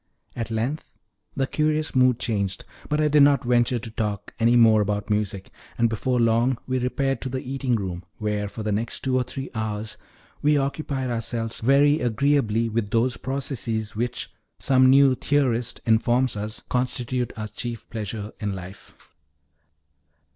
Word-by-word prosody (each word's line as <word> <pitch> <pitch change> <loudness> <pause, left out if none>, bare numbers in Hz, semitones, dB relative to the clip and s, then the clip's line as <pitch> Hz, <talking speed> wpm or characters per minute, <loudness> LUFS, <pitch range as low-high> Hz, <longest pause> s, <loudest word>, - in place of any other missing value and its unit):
At 115 -1 -4
length 120 +8 -2 0.5
the 135 -2 +1
curious 155 +2 0
mood 130 -2 +4
changed, 100 -5 -2 0.2
but 150 0 +1
I 155 - +3
did 150 0 +4
not 140 0 +5
venture 120 0 +2
to 115 -1 -7
talk 105 -2 -3
any 115 +1 +4
more 110 -2 +6
about 105 0 -2
music, 100 -2 -2 0.3
and 115 - +3
before 125 +3 -1
very 120 - +4
long 115 +3 +2
we 130 0 -1
repaired 135 +2 -1
to 130 - -4
the 130 - -3
eating 130 -1 -1
room, 95 -4 -4
where, 105 -1 -2
for 110 - -7
the 105 - -1
next 110 +3 -1
two 130 -1 0
or 130 - +3
three 135 +2 -5
hours, 110 -1 -3 0.4
we 150 0 +4
occupied 135 -2 -2
ourselves 115 -1 -2
very 140 +5 +4
agreeably 120 -3 +1
with 110 -2 -2
those 120 +3 +1
processes 120 -5 -3
which, 120 +3 -3 0.3
some 130 -1 +4
new 135 0 +6
theorist 125 -4 0
informs 120 +2 +2
us, 105 +1 -5
constitute 125 -1 -1
our 110 -1 -4
chief 120 0 -6
pleasure 105 -1 -5
in 105 -2 -2
life. 95 +1 -11
120 Hz, 160 wpm, -24 LUFS, 110-130 Hz, 0.5 s, more